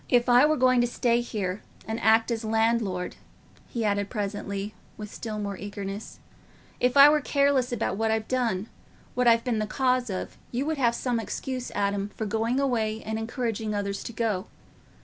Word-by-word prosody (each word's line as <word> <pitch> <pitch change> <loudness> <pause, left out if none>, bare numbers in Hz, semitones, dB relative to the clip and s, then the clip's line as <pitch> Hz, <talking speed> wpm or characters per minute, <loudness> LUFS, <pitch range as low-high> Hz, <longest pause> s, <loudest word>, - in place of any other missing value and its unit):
"If 245 -1 +3
I 250 +4 +6
were 310 0 +2
going 255 -1 +4
to 240 - +2
stay 240 0 +1
here 200 -5 -3 0.3
and 220 +1 -2
act 225 +2 +4
as 230 -1 -2
landlord," 220 -4 0 0.5
he 230 -2 -3
added 200 -1 0
presently, 205 -1 -3 0.2
with 210 -1 -8
still 220 -2 -5
more 200 -2 -3
eagerness—"if 205 +5 -5
I 280 +1 +11
were 300 0 +4
careless 280 -3 +2
about 225 -4 -1
what 225 +1 +1
I've 220 0 0
done—what 240 +1 -3
I've 230 0 +5
been 235 -3 0
the 215 - -1
cause 255 +1 +1
of, 185 -2 -5
you 250 +3 -2
would 315 0 -1
have 235 -2 +3
some 245 -2 -1
excuse, 255 +3 -4
Adam, 200 0 0
for 220 - -3
going 225 +4 0
away 225 -5 0
and 220 0 -3
encouraging 225 -2 -2
others 200 -1 -2
to - - -5
go. 220 -4 -1
225 Hz, 175 wpm, -27 LUFS, 205-245 Hz, 0.5 s, I